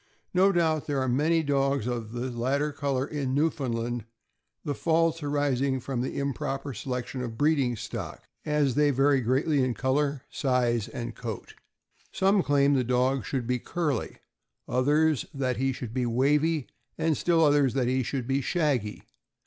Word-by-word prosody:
No 190 +2 +5
doubt 160 -4 +1
there 145 -2 0
are 130 - 0
many 155 +6 +2
dogs 140 -3 +1
of 120 -3 -3
the 120 +2 -3
latter 135 +5 0
color 140 -2 -1
in 140 -3 -2
Newfoundland, 120 -6 -1 0.6
the 145 - -1
faults 165 +2 +1
arising 140 -2 0
from 125 -1 -3
the 130 - -3
improper 140 0 -3
selection 125 +2 -4
of 125 - -3
the 115 - -10
breeding 140 -4 +2
stock, - - -6 0.2
as 150 -3 +1
they 150 +2 +3
vary 135 0 +3
greatly 135 +4 +2
in 125 -2 0
color, 140 +3 0
size, 125 -5 +1
and 120 -1 -6
coat. 110 -4 -7 0.6
Some 195 +1 +3
claim 140 0 +3
the 130 -2 +2
dog 125 +2 +1
should 130 -4 -2
be 125 +1 0
curly, 150 -3 -2 0.5
others 145 +2 +2
that 130 -3 -1
he 135 +2 +1
should 125 -3 -6
be 125 -1 0
wavy, 145 +5 +2 0.3
and 160 -1 +1
still 165 +2 +3
others 145 -3 +3
that 130 -3 +1
he 130 +1 +1
should 130 0 -3
be 135 +2 0
shaggy. 135 - -1
135 Hz, 165 wpm, -27 LUFS, 125-150 Hz, 0.6 s, No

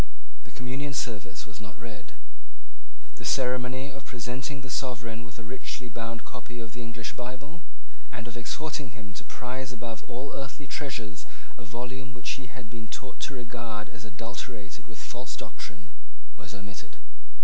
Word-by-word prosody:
The - - -9
Communion 135 +3 +2
Service 110 -8 +2
was 105 -2 -6
not 105 +1 -5
read. 115 -8 -5 1.0
The - - -4
ceremony 130 +1 +5
of 135 - -4
presenting 125 +3 +2
the 135 - -4
sovereign 115 -4 +3
with 115 -2 -7
a 115 - -3
richly 125 +1 0
bound 115 -1 0
copy 120 0 -4
of 115 -1 -1
the 120 - -1
English 115 -1 0
Bible, 130 +7 -2 0.5
and 115 - -1
of 120 - -2
exhorting 130 0 +2
him 100 -3 -4
to - - -1
prize 130 +1 0
above 115 -2 -1
all 130 +4 0
earthly 135 +1 -1
treasures 120 -9 +1 0.3
a 120 - -6
volume 130 +3 0
which - - +3
he 130 - -3
had 120 +1 -5
been 110 0 -3
taught 130 +3 -2
to 140 - -2
regard 115 -3 0
as 115 - -5
adulterated 110 -1 -2
with 110 - -6
false 120 +2 -1
doctrine, 100 -1 -4 0.4
was 95 +2 -4
omitted. 100 0 -4
120 Hz, 160 wpm, -34 LUFS, 110-130 Hz, 1.0 s, ceremony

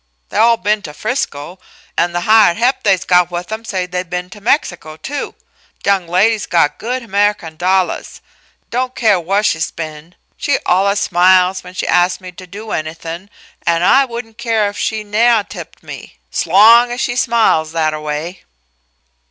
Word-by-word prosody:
They - - -5
all 230 +1 +5
been 210 +2 0
to 150 -6 -9
Frisco, 185 - -4 0.4
an' 175 - +1
the 175 0 -2
hired 215 -2 +4
he'p 245 +3 +1
they's 190 -3 +2
got 180 -1 +3
with 175 +2 -6
'em 220 +1 -4
say 190 -5 -3
they 180 0 -3
been 180 0 -5
to 205 - -12
Mexico, 175 - -1
too. 285 - -5 0.5
Th' - - -9
young 195 -3 +1
lady's 200 +5 +2
got 165 -4 +1
good 250 +3 -3
Amehican 205 -6 -1
dollahs, 185 +2 -1 0.5
don' 255 +2 -1
care 215 -7 +2
wha' 195 +5 0
she's 160 -6 0
been. 155 +1 -8 0.2
She 285 - 0
allus 200 +3 +2
smiles 185 +1 +3
when 180 0 -12
she - - -3
ask 180 +1 +2
me 185 -1 -10
to 185 +1 -12
do 210 +4 -9
anythin', 165 +4 -5 0.3
an' 170 0 +1
I 270 +8 +5
wouldn' 235 -2 -7
care 225 -2 0
if 205 - -10
she 220 -1 -2
nevah 220 +1 +2
tipped - - -10
me, - - -10
's - - -2
long 230 +7 +6
as 245 - -4
she 245 - -1
smiles 230 -11 +2
thataway." 155 +1 -3
190 Hz, 175 wpm, -16 LUFS, 175-220 Hz, 0.5 s, long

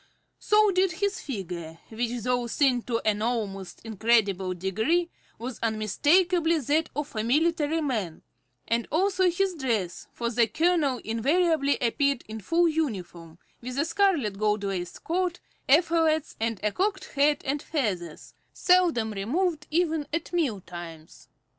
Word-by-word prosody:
So 425 -1 +4
did 370 -1 +2
his 405 +2 -1
figure, 175 - -6
which, 235 +1 -3
though 245 0 0
thin 255 0 +2
to 230 -1 0
an 210 -1 +1
almost 210 -5 -3
incredible 205 -4 +1
degree, 220 - 0 0.3
was 235 +1 -6
unmistakably 320 - +2
that 305 +3 0
of 295 -3 -4
a 215 - -1
military 315 +5 +1
man, 215 - -3 0.4
and 230 +1 0
also 375 +2 +2
his 375 +2 0
dress, 230 - -2
for 235 -1 -3
the 235 -1 +3
colonel 315 -4 +1
invariably 285 +6 +1
appeared 275 +2 +1
in 220 0 -7
full 335 - +2
uniform, 185 - -3 0.2
with 250 +2 -6
a 290 - +2
scarlet, 325 - +1
gold 210 -1 +1
laced 185 -3 -4
coat, 350 +1 -1 0.3
epaulettes, 320 0 +3
and 225 -2 -1
a 210 - +1
cocked 385 - -1
hat 290 +1 +2
and 285 +2 -1
feathers, 190 - -3 0.2
seldom 345 - +3
removed 300 - -1
even 320 -2 0
at 330 +3 -3
meal 270 - 0
times. 170 -3 -10
260 Hz, 140 wpm, -27 LUFS, 215-330 Hz, 0.4 s, So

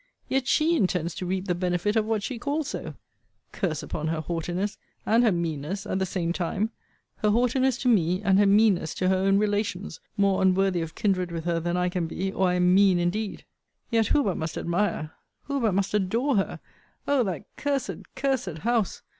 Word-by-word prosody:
Yet 265 -1 0
she 320 +2 +3
intends 180 - 0
to 180 +2 -5
reap 185 +1 -2
the 180 - +2
benefit 180 +3 0
of 220 -1 +2
what 220 -2 -1
she 240 +2 -4
calls 290 +3 -2
so! - - -5 0.6
Curse 175 -8 -2
upon 155 0 -4
her 160 0 -1
haughtiness, 175 +5 -3 0.3
and 230 +3 +4
her 225 - +4
meanness, 170 +3 -3
at 190 - -1
the 190 - 0
same 170 -2 -1
time! 190 +5 -1 0.5
Her 210 - +1
haughtiness 250 +3 +2
to - - 0
me, 185 -6 +3
and 195 -2 +4
her 205 - +5
meanness 200 -5 +3
to 185 - +1
her 190 - +3
own 195 +1 +3
relations; 205 -4 -1 0.2
more 200 -1 +2
unworthy 190 -1 +3
of 165 -1 -6
kindred 185 -5 0
with 165 -1 -5
her, 170 -1 +1
than 175 +1 -1
I 180 0 +1
can 180 -2 -1
be, 190 +4 -3
or 190 -1 +1
I 180 - +1
am 180 0 +3
mean 195 -1 +5
indeed. 195 +5 -2 0.5
Yet 225 -2 +3
who 290 - +3
but 195 -5 -1
must 160 0 -4
admire, 170 -3 -1 0.3
who 280 -1 -2
but 215 -5 +2
must 195 +1 0
adore 225 +8 +1
her; 195 - 0 0.5
Oh! 280 -3 +3
that 185 -4 -3
cursed, 205 - -3
cursed 255 - -1
house! 230 0 0
195 Hz, 200 wpm, -26 LUFS, 175-220 Hz, 0.6 s, her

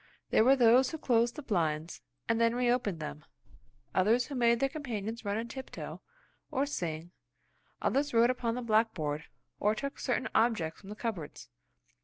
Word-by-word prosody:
There - - +5
were 265 +3 +6
those 250 +1 +5
who 320 - -5
closed 235 -4 +2
the 300 - -7
blinds, 165 - -1 0.3
and 230 0 +1
then 230 0 +3
reopened 240 -7 +1
them; 75 - -6 0.7
others 220 +6 +3
who 290 - -8
made 235 -2 +3
their 275 - +3
companions 235 -6 -5
run 205 0 -1
on 230 +1 -3
tiptoe, 265 +2 -7 0.5
or 280 -2 0
sing; 170 - -4 0.7
others 285 +2 +1
wrote 235 +1 +5
upon 235 -2 -2
the 250 - -4
blackboard, 215 -10 +1 0.3
or 210 +1 +2
took 280 +5 -5
certain 255 -1 -1
objects 220 -9 +1
from 195 - -12
the 210 - -6
cupboards. 190 - -5
230 Hz, 165 wpm, -31 LUFS, 200-250 Hz, 0.7 s, were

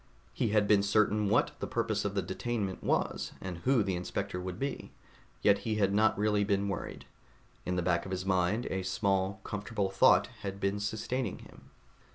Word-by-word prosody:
He - - 0
had 105 -1 +2
been 105 -1 +5
certain 105 0 +2
what - - +3
the - - -3
purpose - - -1
of 100 0 -2
the 100 - +1
detainment 100 +1 -3
was, - - -1
and 90 -3 -6
who 125 +3 +3
the 95 -2 -1
inspector 90 0 -3
would 90 -1 -5
be, 140 +1 -4 0.5
yet 100 -1 +5
he 110 -1 -2
had 100 -2 +2
not 110 +1 +3
really 105 0 +2
been 100 -1 +1
worried. 100 - -5 0.6
In 90 - 0
the 90 - 0
back 85 -1 +1
of - - -7
his 95 0 -3
mind, 95 +4 +1
a 95 - -1
small, 95 0 0
comfortable 105 -1 -3
thought 95 - +5 0.2
had 100 0 -5
been 100 +1 0
sustaining 110 +2 -2
him. - - -15
100 Hz, 190 wpm, -31 LUFS, 95-105 Hz, 0.6 s, been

